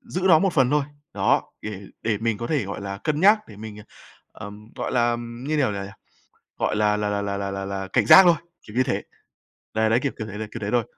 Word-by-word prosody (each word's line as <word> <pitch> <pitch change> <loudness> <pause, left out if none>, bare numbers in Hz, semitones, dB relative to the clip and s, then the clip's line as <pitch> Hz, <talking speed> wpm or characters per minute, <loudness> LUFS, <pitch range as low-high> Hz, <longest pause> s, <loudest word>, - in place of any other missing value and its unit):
giữ 230 -8 -5
nó 160 - +7
một 190 +2 +1
phần 130 -3 +3
thôi. 150 -1 +2 0.3
Đó, - - +1
để 105 -2 -6 0.2
để 110 -2 0
mình 115 -1 -1
có 120 - -4
thể, 145 -5 0
gọi 100 - -6
là, 100 0 -5
cân 155 -1 0
nhắc, 205 +3 +6
để 105 - -12
mình, 105 0 -8 0.6
ờ, 105 - -9
ừm, 105 +1 -12
gọi - - -4
là, 120 -1 +2
như 120 +6 -4
kiểu 130 -7 +1
nào 100 -1 -4
nhỉ, 100 - -9 0.7
gọi - - 0
là 105 0 +2
là 105 0 -1
là 100 -1 -3
là 100 0 -3
là 95 0 -4
là 95 -1 -4
cảnh 125 -4 +3
giác 190 - +10
thôi, 175 -2 +5 0.3
kiểu 105 - -11
như 130 - +3
thế. - - -2 0.7
Đấy, 110 0 +2
đấy, 115 - +3
kiểu, 140 - -1
kiểu 110 - -4
thế, 105 - -7
đấy, 110 -1 -5
kiểu 120 - -6
thế 105 -1 -3
thôi. 120 -2 +2
110 Hz, 255 wpm, -24 LUFS, 105-130 Hz, 0.7 s, giác